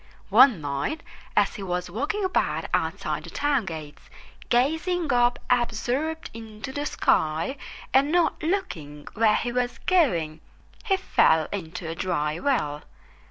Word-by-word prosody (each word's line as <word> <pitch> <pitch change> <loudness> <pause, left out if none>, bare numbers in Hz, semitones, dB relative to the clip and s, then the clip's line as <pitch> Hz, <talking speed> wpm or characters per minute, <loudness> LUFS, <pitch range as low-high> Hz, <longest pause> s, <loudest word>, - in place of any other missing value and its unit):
One 230 - +6
night, 145 - -3 0.3
as - - +4
he 210 - -8
was 180 -1 -2
walking 290 - -2
about 375 - 0
outside - - -1
the - - -9
town 285 -5 0
gates, 155 -4 -8 0.4
gazing 320 +5 +1
up 245 0 +3
absorbed 250 +7 -1
into 225 +2 -8
the 290 +2 -3
sky 160 - +1 0.4
and 275 +3 +4
not 350 0 +2
looking 165 - -3
where 215 -1 +3
he 240 - -1
was 245 0 -1
going, 170 - +2 0.4
he 390 -4 +2
fell 160 - +3
into 180 -2 -5
a 165 - -3
dry 160 -3 -1
well. 150 - 0
240 Hz, 135 wpm, -25 LUFS, -, 0.4 s, One